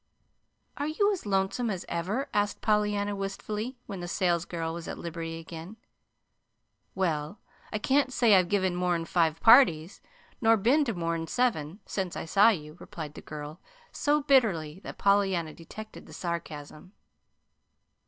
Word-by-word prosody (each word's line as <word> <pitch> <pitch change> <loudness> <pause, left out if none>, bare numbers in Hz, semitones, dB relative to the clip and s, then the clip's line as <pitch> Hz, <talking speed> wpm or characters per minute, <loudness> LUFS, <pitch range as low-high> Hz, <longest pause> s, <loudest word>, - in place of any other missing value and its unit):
"Are 285 - -2
you 405 +7 +2
as 355 - -6
lonesome 195 +5 0
as 190 -4 -4
ever?" 190 +11 -2
asked 205 0 0
Pollyanna 210 -1 +1
wistfully, 210 +5 -4
when 195 - -6
the 175 - -5
salesgirl 170 -2 -1
was 170 0 -7
at - - -5
liberty 165 -1 -5
again. 165 +5 -9 1.2
"Well, 170 0 -1 0.3
I 215 - -1
can't 265 +4 +2
say 235 -4 +4
I've 185 -2 +5
given 190 -3 +1
more'n 175 -2 0
five 165 -2 +1
parties, 200 - +6 0.4
nor 225 0 +5
been 250 +9 +3
to 230 -5 -2
more'n 165 -1 -2
seven, 190 -5 -1
since 190 -3 -3
I - - -4
saw 200 +7 +6
you," 155 -6 -3
replied 155 -3 -8
the - - -10
girl 150 +2 -8 0.3
so 295 0 +1
bitterly 195 - +2
that - - -9
Pollyanna 195 -5 +2
detected 215 +6 -10
the - - -12
sarcasm. 170 0 -6
190 Hz, 145 wpm, -28 LUFS, 165-215 Hz, 1.2 s, parties